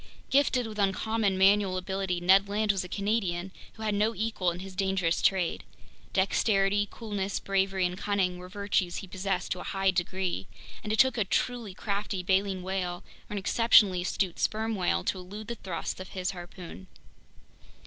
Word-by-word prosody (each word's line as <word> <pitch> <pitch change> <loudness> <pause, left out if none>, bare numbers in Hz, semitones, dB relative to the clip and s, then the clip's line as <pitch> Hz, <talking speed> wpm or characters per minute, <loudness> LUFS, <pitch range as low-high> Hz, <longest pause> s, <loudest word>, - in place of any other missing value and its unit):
Gifted 265 -3 +3
with 215 -1 -7
uncommon 200 0 +1
manual 195 -1 +4
ability, 190 -1 -2
Ned 190 +3 +5
Land 210 +1 +2
was 195 -2 -2
a 180 - -9
Canadian 195 -3 -1 0.2
who 220 - -9
had 215 -1 0
no 215 +3 +1
equal 210 -3 0
in 175 +1 -5
his 190 0 -8
dangerous 190 -3 +1
trade. 185 -3 +1 0.5
Dexterity, 195 +1 +2
coolness, 200 -3 -3
bravery, 195 -1 +1
and 180 0 -1
cunning 190 -2 0
were 180 0 -9
virtues 200 -3 -1
he 195 - -5
possessed 190 0 -2
to 180 - -1
a - - -6
high 195 -1 +1
degree, 180 - -2 0.4
and 215 - -3
it 220 - +1
took 260 -1 +4
a - - +4
truly 225 0 -1
crafty 200 -2 -2
baleen 190 0 +1
whale 180 -2 -3 0.3
or - - -6
an - - -2
exceptionally 200 -2 +5
astute 180 0 -1
sperm 220 +1 0
whale 175 - 0
to 185 - -1
elude 205 +4 -8
the - - -1
thrusts 185 -7 -5
of 185 - -8
his 185 0 -2
harpoon. 175 - -10
195 Hz, 175 wpm, -29 LUFS, 185-205 Hz, 0.5 s, Ned